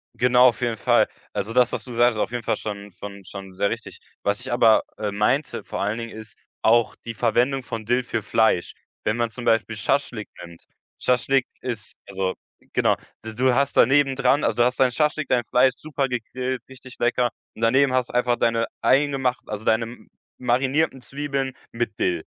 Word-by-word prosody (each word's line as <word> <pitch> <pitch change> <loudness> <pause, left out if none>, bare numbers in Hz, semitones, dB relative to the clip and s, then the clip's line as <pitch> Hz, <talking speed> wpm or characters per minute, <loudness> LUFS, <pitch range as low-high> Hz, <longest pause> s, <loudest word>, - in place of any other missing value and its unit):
Genau, 125 +1 +5
auf 120 - -2
jeden 120 -2 0
Fall. - - +3 0.3
Also 100 +3 -3
das, 125 0 +3
was - - -3
du 125 - -8
sagst, 120 -1 +3
auf - - 0
jeden 120 -1 -3
Fall - - 0
schon 100 -1 -6
von 100 +1 -9
schon 95 0 -9
sehr 100 +2 0
richtig. 115 -1 -6 0.2
Was 100 +2 0
ich 130 +1 -5
aber, 115 -2 +5
äh, 105 -1 -2
meinte 120 +8 0
vor - - -4
allen 105 +3 -1
Dingen, 115 -1 -6
ist 110 -2 -10 0.2
auch 115 0 +3
die 115 - -5
Verwendung 120 +4 +1
von 115 -2 -6
Dill 120 +3 +1
für 115 -2 -3
Fleisch. 105 -3 +2 0.3
Wenn 110 - +1
man 120 -1 0
zum 120 +1 -8
Beispiel 115 -1 +1
Schaschlik 115 0 -1
nimmt, 85 -1 -12 0.4
Schaschlik 125 +1 +2
ist 120 -5 -5
also 95 -1 -2 0.4
genau, - - +2 0.3
d 110 - -7
du 125 +2 +3
hast 140 +1 +1
da - - +7
neben 135 0 +3
dran 135 +2 +3
also - - +1
du 120 - +5
hast 125 +2 0
dein 130 - +5
Schaschlik, 150 +3 0
dein 120 -2 +2
Fleisch 125 +3 +3
super 145 -3 -2
gegrillt, 125 +1 -3
richtig 130 -1 -12
lecker. 120 0 +1 0.2
Und - - -13
daneben 130 +3 +4
hast 130 -1 +1
du - - -12
einfach 125 0 +2
deine 115 0 +1
eingemacht 135 -2 +2
also 105 0 -6
deine 110 +1 +3
m 115 +2 -11 0.3
marinierten 130 +4 +1
Zwiebeln 140 0 -3 0.2
mit 120 +1 -3
Dill. 355 -1 0
120 Hz, 200 wpm, -23 LUFS, 110-130 Hz, 0.4 s, da